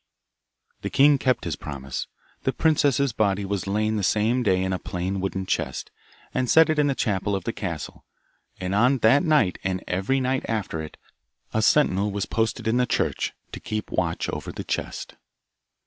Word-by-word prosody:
The - - -3
king 140 0 +5
kept 130 -1 +1
his - - -2
promise. 70 -2 -6 0.3
The - - 0
princess's 140 -4 +2
body 100 -2 +1
was 100 -1 -3
lain 110 +2 0
the - - 0
same 110 +6 +2
day 95 -5 +2
in 95 0 -1
a 90 - -2
plain 90 +2 -3
wooden 95 0 -2
chest, - - -2 0.4
and 130 -1 0
set 160 +3 +6
in 150 -2 +2
the 140 - +1
chapel 100 -4 0
of 95 - -3
the 115 - -3
castle, 85 -7 -5 0.6
and 90 +1 -2
on 125 +6 +4
that 135 +6 +6
night 125 - +2
and 95 -1 -2
every 95 +9 0
night 130 0 0
after 105 -8 -2
it, 80 - -9 0.6
a 110 - +2
sentinel 105 -6 +3
was 100 -1 -2
posted 110 0 -1
in 115 +2 +2
the 125 0 +2
church, - - 0 0.2
to - - -7
keep 110 0 -4
watch 85 -2 -1
over - - -4
the - - -6
chest. - - -4
105 Hz, 180 wpm, -25 LUFS, 95-130 Hz, 0.6 s, set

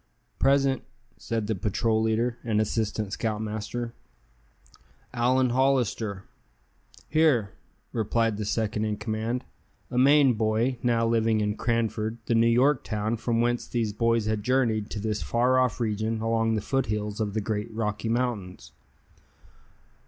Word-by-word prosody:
"Present," 135 -1 +3 0.4
said 115 -2 -2
the 110 - 0
patrol 110 +3 0
leader, 115 +2 0
and 110 -3 0
assistant 110 -1 -1
scoutmaster. 110 +2 -3 1.2
"Allan 125 +1 +2
Hollister." 120 -6 +1 0.8
"Here," 145 -10 +3 0.4
replied 115 -1 0
the 105 - -3
second 110 0 -1
in 105 -1 -2
command, 115 +3 -2 0.5
a 125 - +1
Maine 140 0 +6
boy, 110 +3 0
now 115 -2 +2
living 115 -1 +2
in 105 0 0
Cranford, 115 -1 -1
the - - 0
New 115 0 +4
York 125 +4 +3
town 110 +1 -2
from 115 0 0
whence 120 0 0
these 115 -3 -1
boys 115 0 +1
had 110 -1 -1
journeyed 115 -3 +1
to 105 - -5
this 105 0 -2
far 125 +2 +2
off 130 -1 +1
region 110 0 -1
along 115 0 +1
the 105 - -1
foothills 105 -4 -2
of 105 -1 -2
the - - +2
great 105 +1 -3
Rocky 110 0 -2
Mountains. 115 -6 -2
115 Hz, 140 wpm, -26 LUFS, 110-120 Hz, 1.2 s, Maine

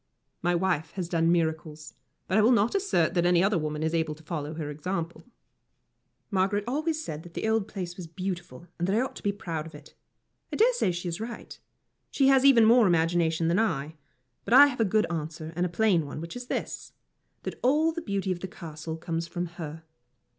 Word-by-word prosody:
My 175 +1 +1
wife 165 -3 0
has 185 -3 -3
done 165 -1 +2
miracles, 160 -2 -2 0.3
but 185 - 0
I 215 - +5
will 225 +4 +5
not 230 -1 +3
assert 385 - +1
that 175 - +2
any 175 0 +4
other 195 -2 +2
woman 150 0 -3
is 160 +1 0
able 160 -2 0
to 160 - -18
follow 155 -1 -4
her 150 -2 -4
example. 165 +3 -4 1.1
Margaret 195 +1 +1
always 310 +5 -1
said 150 0 -5
that 170 +1 -14
the - - -2
old 220 -2 +1
place 180 -5 -6
was 180 -3 -7
beautiful, 175 -3 -6
and 175 - 0
that 195 - +1
I 230 - +3
ought 265 - -3
to - - -10
be 205 - +1
proud 170 -7 -5
of 160 - -12
it. - - -14 0.6
I - - -3
dare 480 +3 +4
say 475 - +1
she 175 +1 -4
is 170 +4 -4
right. 235 +1 -7 0.5
She 270 -1 +3
has 265 -1 +5
even 255 -5 +7
more 230 -1 +6
imagination 165 -1 +2
than 170 +5 +2
I. 160 -9 -1 0.5
But 235 - +2
I 285 +2 +11
have 275 -4 -2
a - - +4
good 215 +2 +2
answer 160 0 -5
and 175 +1 +1
a - - -8
plain 180 -2 +2
one, 140 - -6
which 170 +5 -7
is 245 0 -7
this - - -4 0.5
that - - -6
all 300 +6 +3
the 335 +1 -5
beauty 200 - -2
of 180 - -2
the 190 - -5
Castle 160 -3 -7
comes 165 0 -3
from 175 +1 -3
her. 165 -2 -8
175 Hz, 220 wpm, -27 LUFS, 160-220 Hz, 1.1 s, I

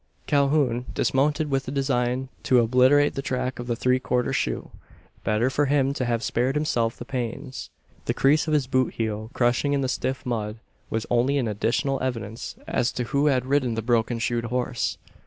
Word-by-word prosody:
Calhoun 140 -4 +2
dismounted, 145 +2 +1
with 135 -1 0
the - - -3
design 130 -2 0
to 130 - +3
obliterate 130 +5 +4
the 135 - -3
track 130 -1 -2
of 120 - -5
the 120 - 0
three 125 +2 +2
quarter 125 +1 0
shoe. - - -2 0.5
Better 110 +3 +1
for 145 +2 +1
him 140 -1 +2
to 130 - -2
have 115 -1 -1
spared 125 +5 0
himself 120 -7 0
the 120 - -8
pains. 125 +1 -5 0.4
The - - -1
crease 150 +4 +3
of 155 - 0
his 145 -3 +2
boot 130 -1 0
heel 110 -1 -3
crushing 125 +4 +2
in 140 - +1
the 130 - 0
stiff 130 +1 -2
mud 110 -3 -2 0.3
was 110 0 -2
only 125 +4 +3
an 125 -4 0
additional 115 +6 0
evidence 115 -3 -4
as 120 - 0
to 125 - -2
who 140 +4 +1
had 130 -3 +2
ridden 130 -3 +1
the 115 - -2
broken 115 0 +1
shoed 120 0 -1
horse. 125 0 -1
125 Hz, 190 wpm, -25 LUFS, 120-135 Hz, 0.5 s, obliterate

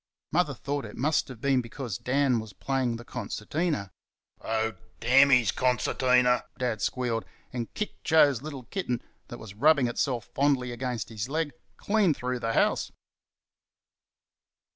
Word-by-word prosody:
Mother 160 -3 +1
thought 140 +3 -3
it 105 - -10
must 150 +5 +1
have 130 -4 -10
been 135 -1 +3
because 115 -3 -6
Dan 130 -2 +2
was 110 -3 -8
playing 130 +1 -1
the 120 +1 -9
concertina. 145 - -3 0.5
"Oh, 110 0 0 0.3
DAMN 135 +4 +6
his 125 -5 +5
concertina!" 125 0 +2
Dad 120 -4 -1
squealed, 120 -3 -1 0.3
and 120 -2 -4
kicked 210 - -4
Joe's 150 -7 +4
little 140 -3 -7
kitten, 125 - -3 0.2
that 120 - -8
was 110 -4 -10
rubbing 140 +4 +4
itself 120 0 -1
fondly 135 -3 +2
against 120 -4 -3
his 110 +2 -4
leg, 155 0 -1 0.3
clean 200 -7 +2
through 125 0 -3
the 115 -1 -1
house. - - +2
125 Hz, 140 wpm, -28 LUFS, 115-140 Hz, 0.5 s, DAMN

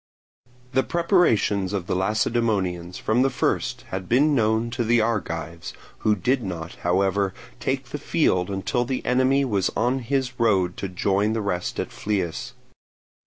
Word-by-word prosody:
The 130 0 +3
preparations 130 - +2
of 95 -4 -2
the - - -2
Lacedaemonians 95 -3 0
from 110 +3 +1
the 135 - +4
first 125 -1 -1
had 95 -1 -5
been 145 +5 +4
known 110 -1 +1
to 120 0 -1
the 120 +1 +3
Argives, 85 -7 -2 0.3
who 105 -1 +2
did 125 +7 +1
not, 85 -5 -5
however, 95 +2 +1 0.2
take - - -2
the - - -5
field 90 0 +1
until 100 +5 -1
the 130 +1 -3
enemy 130 +2 +3
was 100 -7 +1
on 125 +5 +1
his 130 0 -2
road 95 -6 +2
to 100 - -4
join 100 +3 +1
the 110 - -1
rest 90 -3 -2
at - - -3
Phlius. 105 +5 -3
110 Hz, 155 wpm, -24 LUFS, 95-125 Hz, 0.3 s, the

